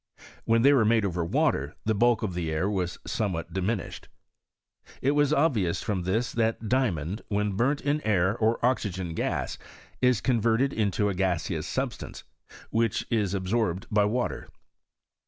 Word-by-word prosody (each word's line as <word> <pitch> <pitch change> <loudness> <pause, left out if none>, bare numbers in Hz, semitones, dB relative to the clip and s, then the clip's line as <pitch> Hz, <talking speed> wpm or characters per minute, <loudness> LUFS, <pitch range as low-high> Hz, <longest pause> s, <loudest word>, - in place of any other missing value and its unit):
When 115 0 +3
they 140 +2 +7
were 130 -5 +4
made 110 -1 +3
over 90 -3 -1
water, 85 - 0
the 110 - +2
bulk 120 +2 +2
of 100 -4 -2
the 85 -2 -2
air 80 +4 0
was 95 -4 -2
somewhat 95 -8 -2
diminished. 95 +3 -3 0.9
It 135 - +2
was 145 0 +2
obvious 135 - +1
from 100 -4 -1
this 110 +6 0
that 115 -1 -1
diamond 105 - 0
when 105 0 0
burnt 130 +9 +1
in 145 +1 0
air 100 -3 +2
or 115 0 +1
oxygen 95 -9 -1
gas, - - -2 0.4
is 125 -4 +4
converted 120 +2 +1
into 105 -1 +1
a 100 - 0
gaseous 90 -3 -1
substance, - - -4 0.5
which 115 -1 0
is 105 -4 +1
ab 95 -1 -3
sorbed 100 -3 0
by 105 -1 +4
water. 120 +4 -2
110 Hz, 155 wpm, -27 LUFS, 95-120 Hz, 0.9 s, they